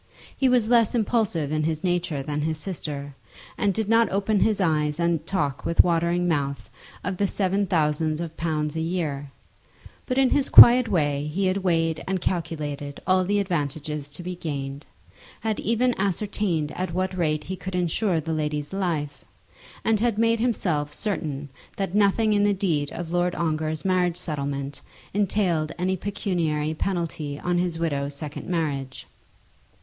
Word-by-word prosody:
He 265 Hz, -, +2 dB
was 245 Hz, -3 st, +3 dB
less 235 Hz, -1 st, +4 dB
impulsive 210 Hz, -, 0 dB
in 155 Hz, 0 st, 0 dB
his 155 Hz, 0 st, -1 dB
nature 175 Hz, -6 st, -1 dB
than 150 Hz, +1 st, -2 dB
his 155 Hz, +1 st, -1 dB
sister, 150 Hz, -6 st, -5 dB, 0.4 s
and 205 Hz, -, +1 dB
did 215 Hz, +2 st, -2 dB
not 225 Hz, +1 st, +4 dB
open 200 Hz, +2 st, +1 dB
his 215 Hz, -1 st, +2 dB
eyes 155 Hz, -4 st, +1 dB
and 170 Hz, -2 st, +1 dB
talk 145 Hz, -8 st, -1 dB
with 170 Hz, -, +4 dB
watering 170 Hz, +1 st, +1 dB
mouth 140 Hz, -4 st, -2 dB, 0.3 s
of 185 Hz, 0 st, -3 dB
the 200 Hz, -, +2 dB
seven 195 Hz, +1 st, 0 dB
thousands 155 Hz, -1 st, +1 dB
of 165 Hz, -1 st, -5 dB
pounds 155 Hz, -2 st, -2 dB
a -, -, -1 dB
year; 160 Hz, -5 st, -2 dB, 0.8 s
but 255 Hz, -, -1 dB
in 265 Hz, -2 st, +4 dB
his 280 Hz, -, +2 dB
quiet 245 Hz, 0 st, +10 dB
way 145 Hz, -5 st, 0 dB
he 185 Hz, +6 st, -1 dB
had 185 Hz, +1 st, +1 dB
weighed 165 Hz, -4 st, 0 dB
and 190 Hz, 0 st, 0 dB
calculated 150 Hz, -5 st, -3 dB
all 185 Hz, 0 st, +3 dB
the 205 Hz, +3 st, +1 dB
advantages 150 Hz, -5 st, -2 dB
to 150 Hz, +5 st, -8 dB
be 180 Hz, +1 st, -4 dB
gained, 140 Hz, -3 st, -5 dB, 0.5 s
had 220 Hz, -1 st, -1 dB
even 245 Hz, +3 st, +1 dB
ascertained 195 Hz, -5 st, -1 dB
at 180 Hz, -2 st, -4 dB
what 185 Hz, 0 st, -1 dB
rate 155 Hz, -4 st, 0 dB
he 190 Hz, -, -5 dB
could 185 Hz, 0 st, -6 dB
insure 180 Hz, +1 st, +1 dB
the 160 Hz, +1 st, -3 dB
lady's 150 Hz, 0 st, -2 dB
life, 160 Hz, -7 st, -2 dB, 0.6 s
and 225 Hz, -2 st, +3 dB
had 230 Hz, -1 st, +1 dB
made 230 Hz, 0 st, +3 dB
himself 175 Hz, -11 st, 0 dB
certain 150 Hz, -8 st, -3 dB, 0.3 s
that 195 Hz, -2 st, -3 dB
nothing 210 Hz, +1 st, +3 dB
in 205 Hz, 0 st, +3 dB
the 205 Hz, -1 st, +3 dB
deed 160 Hz, -7 st, 0 dB
of 170 Hz, -1 st, -6 dB
Lord 175 Hz, 0 st, +1 dB
Ongar's 155 Hz, -1 st, -1 dB
marriage 180 Hz, -2 st, +2 dB
settlement 140 Hz, -4 st, -4 dB, 0.3 s
entailed 185 Hz, -6 st, +1 dB
any 185 Hz, +1 st, 0 dB
pecuniary 170 Hz, -6 st, -1 dB
penalty 165 Hz, -4 st, -3 dB
on 175 Hz, 0 st, 0 dB
his 175 Hz, -2 st, -1 dB
widow's 145 Hz, -4 st, -2 dB
second 150 Hz, +1 st, -6 dB
marriage. 140 Hz, -6 st, -2 dB
170 Hz, 165 wpm, -25 LUFS, 150-195 Hz, 0.8 s, quiet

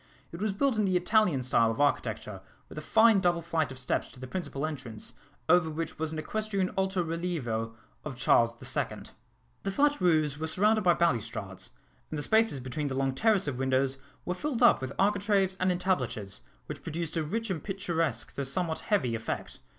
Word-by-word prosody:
It 170 Hz, -, -8 dB
was 215 Hz, -1 st, +1 dB
built 230 Hz, +3 st, +1 dB
in 210 Hz, -, +3 dB
the 185 Hz, -2 st, +2 dB
Italian 180 Hz, -, +2 dB
style 115 Hz, -2 st, +3 dB
of 115 Hz, +4 st, -3 dB
architecture, 110 Hz, -8 st, 0 dB, 0.3 s
with -, -, -11 dB
a -, -, -7 dB
fine 220 Hz, +4 st, +5 dB
double 175 Hz, -2 st, +1 dB
flight 160 Hz, -4 st, 0 dB
of 130 Hz, -, -8 dB
steps 125 Hz, -, -1 dB
to -, -, -14 dB
the 130 Hz, -, -6 dB
principal 145 Hz, -1 st, -3 dB
entrance, 125 Hz, -7 st, -6 dB, 0.3 s
over 170 Hz, 0 st, +4 dB
which 160 Hz, 0 st, -5 dB
was 160 Hz, 0 st, -1 dB
an 160 Hz, -, -5 dB
equestrian 200 Hz, +2 st, -2 dB
alto 190 Hz, -1 st, +1 dB
relievo 155 Hz, -10 st, -3 dB, 0.3 s
of 145 Hz, -4 st, -5 dB
Charles 115 Hz, -2 st, +3 dB
the -, -, -12 dB
Second. -, -, -3 dB, 0.5 s
The 195 Hz, -, -2 dB
flat 290 Hz, +5 st, +2 dB
roofs 155 Hz, -5 st, +2 dB
were 160 Hz, -, -2 dB
surrounded 210 Hz, +6 st, +3 dB
by 175 Hz, -2 st, +5 dB
balustrades, 115 Hz, -, -1 dB, 0.4 s
and 155 Hz, -, -4 dB
the 145 Hz, -, -2 dB
spaces 220 Hz, -8 st, +3 dB
between 130 Hz, +4 st, -3 dB
the 135 Hz, -, -3 dB
long 135 Hz, 0 st, 0 dB
terrace 205 Hz, +3 st, +2 dB
of 130 Hz, -3 st, -3 dB
windows 135 Hz, 0 st, +1 dB, 0.3 s
were 180 Hz, -, -1 dB
filled 250 Hz, +4 st, -2 dB
up 240 Hz, -, +6 dB
with 130 Hz, 0 st, -4 dB
architraves 200 Hz, -1 st, +2 dB
and 185 Hz, -, +2 dB
entablatures, 140 Hz, -, -2 dB, 0.2 s
which -, -, -7 dB
produced 165 Hz, 0 st, -4 dB
a 165 Hz, -, +1 dB
rich 225 Hz, +7 st, -2 dB
and 165 Hz, -5 st, -3 dB
picturesque 165 Hz, -, -2 dB
though -, -, -4 dB
somewhat 160 Hz, +4 st, -1 dB
heavy 190 Hz, -, +2 dB
effect. 115 Hz, 0 st, -4 dB
160 Hz, 195 wpm, -29 LUFS, 130-190 Hz, 0.5 s, up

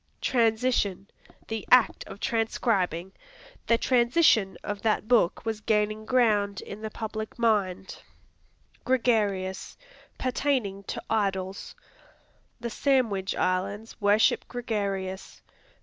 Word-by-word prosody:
Transition 225 Hz, -5 st, +1 dB, 0.4 s
The 225 Hz, -1 st, -4 dB
act 250 Hz, -2 st, +5 dB
of -, -, -10 dB
transcribing; 205 Hz, -7 st, 0 dB, 0.6 s
"The 230 Hz, -, +4 dB
transition 235 Hz, -, +3 dB
of 205 Hz, -1 st, -4 dB
that 215 Hz, -1 st, 0 dB
book 230 Hz, -4 st, +2 dB
was 220 Hz, -1 st, -3 dB
gaining 215 Hz, 0 st, 0 dB
ground 210 Hz, -5 st, +2 dB
in 205 Hz, -, -9 dB
the 220 Hz, -, -4 dB
public 220 Hz, 0 st, -6 dB
mind." 195 Hz, -5 st, 0 dB, 0.8 s
Gregarious 210 Hz, -7 st, 0 dB, 0.4 s
Pertaining 255 Hz, -6 st, -1 dB
to -, -, -5 dB
idols; 195 Hz, -3 st, -2 dB, 0.8 s
"The 235 Hz, 0 st, -5 dB
Sandwich 225 Hz, -8 st, +1 dB
Islands 200 Hz, +5 st, -2 dB
worship 205 Hz, +2 st, +3 dB
gregarious." 200 Hz, -6 st, -4 dB
215 Hz, 100 wpm, -27 LUFS, 195-235 Hz, 0.8 s, act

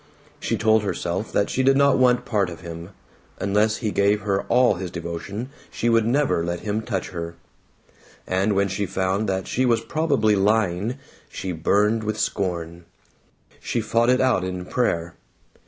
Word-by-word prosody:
She -, -, -1 dB
told 110 Hz, 0 st, +3 dB
herself 95 Hz, 0 st, -3 dB
that 100 Hz, -, +1 dB
she 130 Hz, -, 0 dB
did 135 Hz, +1 st, +4 dB
not 140 Hz, 0 st, +5 dB
want 125 Hz, -1 st, +3 dB
part 105 Hz, -7 st, 0 dB
of 85 Hz, -2 st, -9 dB
him; 85 Hz, +1 st, -8 dB, 0.5 s
unless 105 Hz, +2 st, +1 dB
he 105 Hz, -, +1 dB
gave 100 Hz, +1 st, +2 dB
her 100 Hz, -1 st, 0 dB
all 125 Hz, -1 st, +4 dB
his 90 Hz, -1 st, -5 dB
devotion 90 Hz, +8 st, -6 dB, 0.2 s
she 120 Hz, -, -1 dB
would 115 Hz, -1 st, +3 dB
never 135 Hz, -, +1 dB
let 85 Hz, 0 st, -3 dB
him 105 Hz, +1 st, -2 dB
touch 100 Hz, -5 st, -3 dB
her; 85 Hz, -1 st, -6 dB, 0.9 s
and 95 Hz, +3 st, +1 dB
when 100 Hz, 0 st, +2 dB
she 100 Hz, +1 st, -2 dB
found 95 Hz, +3 st, -1 dB
that 95 Hz, 0 st, -1 dB
she 130 Hz, -, 0 dB
was 120 Hz, -3 st, +2 dB
probably 140 Hz, -10 st, +1 dB
lying, 105 Hz, +2 st, +1 dB, 0.3 s
she 95 Hz, -, -5 dB
burned 105 Hz, +7 st, +1 dB
with 110 Hz, 0 st, -2 dB
scorn. 85 Hz, -3 st, -2 dB, 0.7 s
She -, -, -2 dB
fought 115 Hz, +2 st, +1 dB
it 125 Hz, 0 st, +4 dB
out 130 Hz, -8 st, +2 dB
in 90 Hz, -1 st, -4 dB
prayer. 85 Hz, -8 st, -1 dB
100 Hz, 170 wpm, -23 LUFS, 90-115 Hz, 0.9 s, not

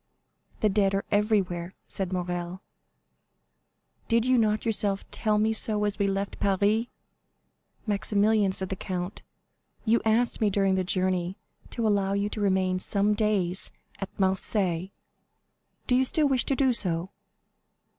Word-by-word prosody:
"The 215 Hz, -, +3 dB
dead 195 Hz, -1 st, +2 dB
are 195 Hz, -, -2 dB
everywhere," 195 Hz, -4 st, 0 dB
said 190 Hz, -2 st, -3 dB
Morrel; 180 Hz, 0 st, -4 dB, 1.4 s
"did 230 Hz, 0 st, +2 dB
you 255 Hz, 0 st, +3 dB
not 215 Hz, -2 st, +1 dB
yourself 205 Hz, -3 st, 0 dB
tell 215 Hz, -1 st, 0 dB
me 220 Hz, +1 st, +2 dB
so 215 Hz, -1 st, +3 dB
as 205 Hz, +1 st, -1 dB
we 200 Hz, -, +2 dB
left 195 Hz, 0 st, -3 dB
Paris?" 205 Hz, +4 st, +1 dB, 1.0 s
"Maximilian," 205 Hz, -1 st, +1 dB
said 190 Hz, 0 st, -4 dB
the 190 Hz, -, -3 dB
count, 180 Hz, +1 st, -5 dB, 0.6 s
"you 230 Hz, +1 st, +3 dB
asked 230 Hz, +2 st, +1 dB
me 215 Hz, -, +3 dB
during 195 Hz, -1 st, +1 dB
the 190 Hz, 0 st, +1 dB
journey 185 Hz, 0 st, -1 dB, 0.3 s
to 230 Hz, -2 st, -2 dB
allow 200 Hz, -2 st, +1 dB
you 200 Hz, +1 st, 0 dB
to 210 Hz, -, -5 dB
remain 190 Hz, -2 st, +1 dB
some 200 Hz, +2 st, +2 dB
days 205 Hz, -4 st, 0 dB, 0.3 s
at 195 Hz, -, -4 dB
Marseilles. 190 Hz, -2 st, 0 dB, 1.0 s
Do 250 Hz, -, +2 dB
you 260 Hz, -, +4 dB
still 300 Hz, +3 st, +3 dB
wish 265 Hz, -3 st, +1 dB
to 275 Hz, -, +1 dB
do 260 Hz, -2 st, +2 dB
so?" 180 Hz, -4 st, +1 dB
200 Hz, 145 wpm, -27 LUFS, 190-215 Hz, 1.4 s, you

